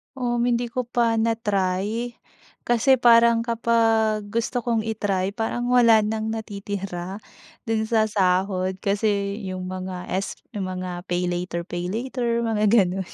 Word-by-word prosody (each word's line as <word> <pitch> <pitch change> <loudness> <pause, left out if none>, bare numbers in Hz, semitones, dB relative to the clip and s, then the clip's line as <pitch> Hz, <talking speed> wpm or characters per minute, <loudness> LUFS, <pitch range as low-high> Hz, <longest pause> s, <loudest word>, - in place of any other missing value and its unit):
Um, 240 -2 0
hindi 240 0 0
ko 250 +1 -3
pa 235 -1 +1
na-try. 220 0 -1 0.5
Kasi 240 +3 +4
parang 235 -1 +6
kapag 225 -2 +2
gusto 230 +2 -1
kong 230 -2 0
i-try 200 -3 -1
parang 240 +2 -2
wala 235 -3 +6
ng 220 +1 -2
natitira, 200 -4 -5 0.5
do'n 225 -1 +1
sa 220 -2 +3
sahod. 185 -1 +1
Kasi, 200 +1 0
'yong 185 0 -5
mga 185 -1 -6
s 190 +1 -2 0.2
'yong 190 -2 -3
mga 180 -1 -5
PayLater-PayLater 180 +7 -2
mga 220 -2 0
gano'n. 190 -4 +2
215 Hz, 125 wpm, -24 LUFS, 190-230 Hz, 0.5 s, parang